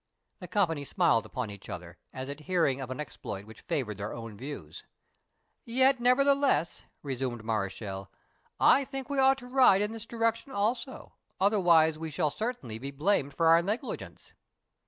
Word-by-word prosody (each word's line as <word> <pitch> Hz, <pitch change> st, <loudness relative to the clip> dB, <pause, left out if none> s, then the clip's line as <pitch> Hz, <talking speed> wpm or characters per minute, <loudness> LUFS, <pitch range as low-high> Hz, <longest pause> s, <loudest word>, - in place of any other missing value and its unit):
The -, -, -8 dB
company 165 Hz, -8 st, 0 dB
smiled 115 Hz, -4 st, +2 dB
upon 125 Hz, -5 st, -4 dB
each 100 Hz, -1 st, -11 dB
other, 85 Hz, 0 st, -8 dB
as 130 Hz, 0 st, -6 dB
at 140 Hz, +1 st, -6 dB
hearing 160 Hz, -7 st, +2 dB
of 130 Hz, -, -6 dB
an 130 Hz, -, -5 dB
exploit 105 Hz, -8 st, -6 dB
which 110 Hz, +1 st, -13 dB
favoured 125 Hz, -, -3 dB
their 100 Hz, +1 st, -4 dB
own 115 Hz, -2 st, -8 dB
views. 110 Hz, -, -8 dB, 0.8 s
"Yet, 260 Hz, +2 st, +3 dB
nevertheless," 275 Hz, -, +3 dB, 0.2 s
resumed 130 Hz, -4 st, -3 dB
Mareschal, 100 Hz, -2 st, -3 dB, 0.5 s
"I 275 Hz, -, +6 dB
think 270 Hz, +1 st, -6 dB
we 280 Hz, -, 0 dB
ought 265 Hz, 0 st, +5 dB
to 250 Hz, -2 st, -11 dB
ride 250 Hz, -6 st, +5 dB
in 210 Hz, -, -2 dB
this 225 Hz, 0 st, -8 dB
direction 230 Hz, +2 st, -1 dB
also, 235 Hz, +5 st, -2 dB, 0.3 s
otherwise 170 Hz, -6 st, +4 dB
we 160 Hz, 0 st, -4 dB
shall 150 Hz, 0 st, 0 dB
certainly 175 Hz, -, -4 dB
be 135 Hz, +3 st, -5 dB
blamed 140 Hz, -1 st, 0 dB
for 165 Hz, -, +1 dB
our 165 Hz, +1 st, +7 dB
negligence." 215 Hz, +9 st, -5 dB
160 Hz, 160 wpm, -29 LUFS, -, 0.8 s, our